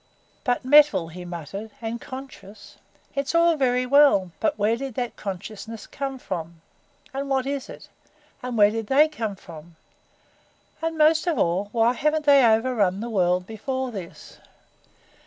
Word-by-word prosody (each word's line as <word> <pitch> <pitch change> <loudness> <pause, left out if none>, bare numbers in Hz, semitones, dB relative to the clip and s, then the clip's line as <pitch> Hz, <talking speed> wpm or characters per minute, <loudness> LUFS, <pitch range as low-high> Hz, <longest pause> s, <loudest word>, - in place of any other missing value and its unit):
"But 245 -2 -1
metal," 290 - +5
he 180 +2 -9
muttered, 175 +5 -7
"and 230 +1 -5
conscious. 260 -7 -11 0.4
It's 280 +3 -2
all 335 0 +4
very 255 -3 +1
well 250 -9 +4
but 310 -5 0
where 215 +2 +2
did 265 -1 -6
that 245 -2 -3
consciousness 210 +3 -7
come 270 -1 -5
from? 170 -7 -6 0.5
And 275 +1 -4
what 265 -1 +1
is 275 -1 -4
it? - - -11 0.5
And 250 -2 -4
where 205 -1 +6
did 225 -1 -4
they 290 +5 +5
come 225 -9 -4
from? 170 -3 -13 1.1
And 325 0 -2
most 315 +2 +4
of 330 -5 +1
all, 190 +1 0
why 230 +1 +3
haven't 300 +3 0
they 280 -2 +6
overrun 220 -4 +2
the 235 +2 -5
world 180 -3 +1
before 260 +5 -4
this? 190 -6 -10
235 Hz, 155 wpm, -24 LUFS, 200-275 Hz, 1.1 s, where